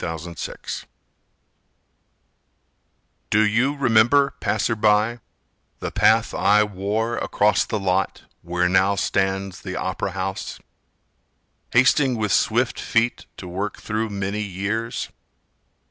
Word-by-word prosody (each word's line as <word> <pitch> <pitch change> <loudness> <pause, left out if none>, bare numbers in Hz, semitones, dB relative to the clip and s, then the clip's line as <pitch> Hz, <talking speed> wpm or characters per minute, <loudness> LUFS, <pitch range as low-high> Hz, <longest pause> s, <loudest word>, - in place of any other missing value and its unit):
James 80 0 -4 0.2
Garber - - -12 2.7
Do 110 +1 +4
you 120 +7 +1
remember, 130 +2 +4
passer 110 +2 0
by, 110 +2 +2 0.6
the - - -4
path - - +3
I 105 +1 +4
wore 105 +3 -2
across 105 0 +2
the 110 - -2
lot 95 0 -1 0.2
where 90 +1 0
now 95 +2 +3
stands 95 -1 -1
the 90 -2 -6
opera 95 0 -3
house 95 +1 -4 1.1
Hasting 130 +1 +4
with 105 -2 -1
swift 115 +5 +1
feet 115 +1 0
to 90 - -8
work 95 +4 -4
through 110 +1 -2
many 100 +1 -3
years? 105 +4 -3
105 Hz, 110 wpm, -22 LUFS, 95-115 Hz, 2.7 s, Do